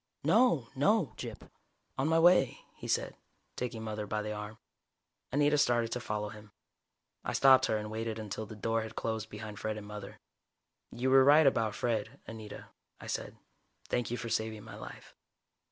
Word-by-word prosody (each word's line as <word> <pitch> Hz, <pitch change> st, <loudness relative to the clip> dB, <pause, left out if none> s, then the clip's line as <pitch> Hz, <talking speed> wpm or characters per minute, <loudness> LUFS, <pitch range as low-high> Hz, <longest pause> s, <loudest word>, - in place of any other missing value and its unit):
"No. 160 Hz, -, +4 dB
No, 190 Hz, +4 st, +2 dB
Gyp. -, -, -8 dB, 0.5 s
On 135 Hz, -, 0 dB
my 160 Hz, +1 st, +3 dB
way," 165 Hz, -6 st, +5 dB
he -, -, -8 dB
said, -, -, 0 dB, 0.4 s
taking 120 Hz, -3 st, -4 dB
Mother 105 Hz, -1 st, -4 dB
by 105 Hz, +1 st, -2 dB
the 105 Hz, 0 st, -3 dB
arm. 105 Hz, +1 st, -7 dB, 0.7 s
Anita 145 Hz, +1 st, +3 dB
started 120 Hz, -4 st, +2 dB
to 125 Hz, -, -1 dB
follow 105 Hz, -3 st, -3 dB
him. 105 Hz, -1 st, -13 dB, 0.7 s
I -, -, -3 dB
stopped 135 Hz, -1 st, +6 dB
her 110 Hz, -, +1 dB
and 105 Hz, 0 st, -5 dB
waited 110 Hz, 0 st, -3 dB
until 110 Hz, 0 st, -5 dB
the 110 Hz, -, -9 dB
door 115 Hz, +2 st, 0 dB
had 110 Hz, 0 st, -7 dB
closed 110 Hz, -1 st, -3 dB
behind 105 Hz, -1 st, -8 dB
Fred 110 Hz, 0 st, -2 dB
and 105 Hz, -, -7 dB
Mother. 105 Hz, 0 st, -8 dB, 0.7 s
"You 130 Hz, +2 st, -1 dB
were 135 Hz, 0 st, +8 dB
right 145 Hz, +3 st, +7 dB
about 110 Hz, -5 st, +2 dB
Fred, 115 Hz, -4 st, -2 dB
Anita," 110 Hz, -2 st, -9 dB, 0.3 s
I -, -, -10 dB
said. -, -, -4 dB, 0.5 s
"Thank 120 Hz, -, 0 dB
you 120 Hz, -, -2 dB
for 120 Hz, -, -5 dB
saving 110 Hz, -1 st, -2 dB
my -, -, -10 dB
life." -, -, -10 dB
110 Hz, 175 wpm, -32 LUFS, 105-130 Hz, 0.7 s, were